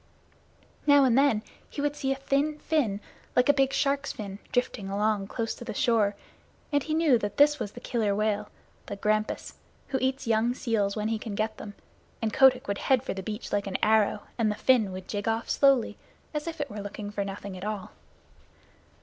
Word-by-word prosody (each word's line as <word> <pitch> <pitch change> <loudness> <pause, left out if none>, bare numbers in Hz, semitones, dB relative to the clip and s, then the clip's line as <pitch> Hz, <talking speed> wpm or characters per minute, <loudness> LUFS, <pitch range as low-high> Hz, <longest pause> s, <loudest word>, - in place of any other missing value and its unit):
Now 285 -1 +7
and 250 -3 +4
then 265 -6 +3 0.3
he - - -8
would 290 0 0
see 270 -2 -1
a - - +1
thin 275 +3 0
fin, 250 -11 0 0.3
like 250 +3 +4
a - - +8
big 270 -1 +2
shark's 280 +1 0
fin, 200 -2 -7
drifting 235 -5 -1
along 205 0 0
close 225 +1 -3
to 240 - -7
shore, 230 -7 +2 0.6
and 285 -1 +2
he 310 +3 -2
knew 310 -7 +4
that 205 -2 -4
that 295 +1 +5
was 205 - -4
the - - -9
Killer 220 -5 0
Whale, 210 0 0 0.4
the 200 - -4
Grampus, 215 +1 -1 0.4
who 265 - 0
eats 265 +1 0
young 230 +2 +2
seals 220 -6 0
when 215 0 -1
he 225 -1 -1
can 215 -2 -5
get 215 +1 -2
them; 205 -1 -8 0.4
and 220 -2 -2
Kotick 255 -2 +5
would 200 0 -2
head 260 -2 +2
for - - -3
the 195 - -5
beach 210 +4 -6
like 205 -1 0
an 190 - -1
arrow, 215 -1 +3 0.2
and 220 -2 +3
the 210 - -1
fin 225 -4 +3
would 185 0 -7
jig 205 0 -3
off 225 +1 -1
slowly, 275 -4 +3 0.3
as 300 +1 -3
if 330 -1 -5
it 285 -3 -3
were 210 0 -5
looking 205 +1 -6
for 205 -1 -2
nothing 195 0 -6
at 185 - -8
all. 210 -2 -4
225 Hz, 205 wpm, -28 LUFS, 205-270 Hz, 0.6 s, a